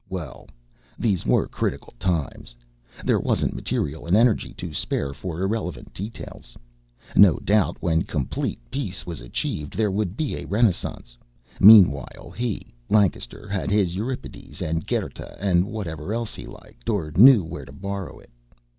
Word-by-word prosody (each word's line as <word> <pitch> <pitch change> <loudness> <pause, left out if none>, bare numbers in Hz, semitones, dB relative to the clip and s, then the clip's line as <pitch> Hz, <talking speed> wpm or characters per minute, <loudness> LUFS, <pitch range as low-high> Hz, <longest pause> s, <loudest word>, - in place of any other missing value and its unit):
Well, 85 -8 -7 0.5
these 100 -7 0
were - - +3
critical - - -3
times. 80 -9 -2 0.5
There - - +3
wasn't - - 0
material 75 +3 -3
and 90 +5 +4
energy 115 -1 +3
to 90 -4 -7
spare 70 -1 -1
for 85 +2 -5
irrelevant 95 -4 -3
details. 100 - -8 0.6
No 100 -5 +7
doubt 105 -1 +1
when 80 -2 +2
complete 70 -7 -3
peace 115 -9 -3
was 85 -6 -6
achieved 70 +4 -4
there 105 -2 +2
would 100 0 -2
be 155 -3 -2
a - - -6
renaissance. 95 - 0 0.4
Meanwhile 95 - +6
he, 120 -4 -3 0.2
Lancaster, 100 - +1
had 100 -2 -2
his 95 -4 +2
Euripides 120 +6 -6
and 80 0 -2
Goethe - - -3
and 90 -2 +2
whatever 95 -3 -4
else 115 -2 -3
he - - -9
liked, - - -11
or 85 -8 -1
knew 120 0 +8
where 80 - -7
to - - -13
borrow 100 +2 -6
it. - - -19
95 Hz, 145 wpm, -24 LUFS, 80-105 Hz, 0.6 s, knew